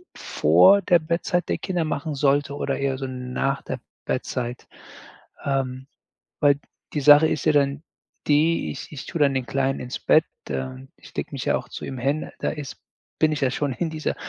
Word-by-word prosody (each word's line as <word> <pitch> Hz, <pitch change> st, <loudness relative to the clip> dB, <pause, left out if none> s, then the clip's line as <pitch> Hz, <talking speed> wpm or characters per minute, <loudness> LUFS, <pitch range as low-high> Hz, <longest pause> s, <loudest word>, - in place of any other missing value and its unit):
vor 200 Hz, +1 st, +5 dB
der 175 Hz, -1 st, +4 dB
Bettzeit 170 Hz, +2 st, -1 dB
der -, -, 0 dB
Kinder 180 Hz, -3 st, -1 dB
machen 150 Hz, 0 st, -3 dB
sollte 140 Hz, 0 st, +1 dB
oder 140 Hz, -1 st, -2 dB
eher 135 Hz, -1 st, 0 dB
so 135 Hz, -, -4 dB
nach 130 Hz, +2 st, -2 dB
der -, -, -5 dB, 0.3 s
Bettzeit. 125 Hz, 0 st, -3 dB, 0.8 s
Ähm, 135 Hz, -1 st, -2 dB, 0.5 s
weil 145 Hz, -1 st, +4 dB, 0.3 s
die 150 Hz, -, 0 dB
Sache 145 Hz, +2 st, +8 dB
ist 150 Hz, -, -2 dB
ja 155 Hz, -, +5 dB
dann 140 Hz, 0 st, +1 dB, 0.5 s
die, 150 Hz, -, +3 dB
ich 75 Hz, -, -8 dB
ich 140 Hz, -, -7 dB
tue 170 Hz, -, -4 dB
dann 140 Hz, -2 st, +4 dB
den 130 Hz, -2 st, -1 dB
Kleinen 135 Hz, +1 st, 0 dB
ins 125 Hz, -, -5 dB
Bett, -, -, +4 dB, 0.3 s
ähm 65 Hz, -1 st, -5 dB
ich -, -, -16 dB
lege -, -, -3 dB
mich -, -, -5 dB
ja -, -, +3 dB
auch -, -, -5 dB
zu -, -, -7 dB
ihm 130 Hz, -, -5 dB
hin. 140 Hz, +5 st, -1 dB
Da -, -, 0 dB
ist 150 Hz, -3 st, -6 dB, 0.4 s
bin 155 Hz, -1 st, +3 dB
ich 150 Hz, -, -2 dB
ja 130 Hz, -, +3 dB
schon 140 Hz, +1 st, -1 dB
in 165 Hz, +4 st, -2 dB
dieser 155 Hz, -1 st, -2 dB
140 Hz, 195 wpm, -24 LUFS, 130-155 Hz, 0.8 s, Sache